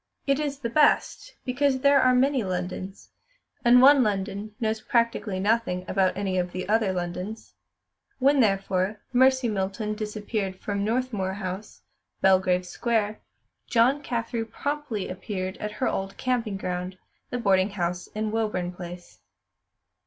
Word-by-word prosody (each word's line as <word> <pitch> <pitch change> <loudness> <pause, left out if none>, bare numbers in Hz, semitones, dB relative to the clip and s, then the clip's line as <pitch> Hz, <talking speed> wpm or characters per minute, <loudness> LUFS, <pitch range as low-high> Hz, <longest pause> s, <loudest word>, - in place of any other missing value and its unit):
It 275 0 +2
is 290 -2 -2
the 235 -4 -4
best, 305 - +2
because 260 0 +1
there 280 0 +5
are 255 0 +4
many 265 -1 +3
Londons, 185 +1 -5 0.5
and 245 +1 +7
one 280 0 +8
London 205 -1 -2
knows 220 -1 -1
practically 230 -4 0
nothing 200 -3 0
about 190 -1 +1
any 190 -2 0
of 180 0 -2
the 185 0 -4
other 215 -1 +2
Londons. 180 +4 -5 0.6
When, 275 +2 +4
therefore, 195 -2 +1
Mercy 260 0 +4
Milton 210 +1 -2
disappeared 210 -2 -3
from 200 -1 -2
Northmuir 220 -4 -1
House, 190 +1 -6 0.4
Belgrave 185 -1 +3
Square, 215 +1 -1 0.5
Joan 255 +4 +3
Carthew 230 -3 -2
promptly 285 -4 -3
appeared 185 0 -4
at 210 0 -5
her 255 - -1
old 195 +1 -3
camping 240 -5 -1
ground, 180 0 -4 0.3
the 245 - -2
boarding 195 -4 +3
house 180 -2 -3
in 215 0 -3
Woburn 210 -6 -1
Place. 175 0 -10
210 Hz, 140 wpm, -26 LUFS, 190-245 Hz, 0.6 s, one